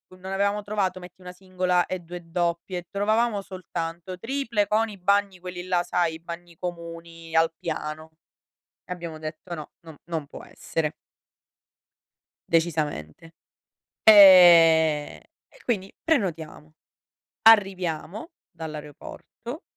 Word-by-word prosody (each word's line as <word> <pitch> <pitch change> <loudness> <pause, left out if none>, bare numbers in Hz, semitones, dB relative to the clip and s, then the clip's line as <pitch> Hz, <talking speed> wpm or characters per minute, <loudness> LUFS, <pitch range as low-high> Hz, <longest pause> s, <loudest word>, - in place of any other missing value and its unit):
non 190 +1 -9
avevamo 200 +2 0
trovato, 195 -3 -2
metti, 180 +1 -14
una 180 0 -9
singola 180 -1 -1
e 185 - -3
2 175 +1 -9
doppie. 175 +1 -2
Trovavamo 215 +1 +1
soltanto 180 -1 -6
triple 230 -3 -1
con 220 +2 +1
i 205 - -10
bagni 200 0 +1
quelli 180 0 -7
là, 180 -1 +1
sai, 170 -2 -1
i - - -11
bagni 170 0 -10
comuni 165 -1 -8
al 165 0 +4
piano, 155 0 -5 0.7
e 180 - -7
abbiamo 170 -3 -7
detto 155 +3 -7
no, 155 -3 -8 0.2
non 160 - -10 0.2
non 160 -3 -3
può - - -11
essere. 160 -1 -4 1.6
Decisamente. 160 - -2 0.7
Ehm, 170 -7 +7 0.3
e - - -21
quindi 195 -5 -2
prenotiamo. 165 - -2 0.7
Arriviamo 195 - +2 0.2
dall'aeroporto 160 - -9
175 Hz, 115 wpm, -25 LUFS, 165-195 Hz, 1.6 s, Ehm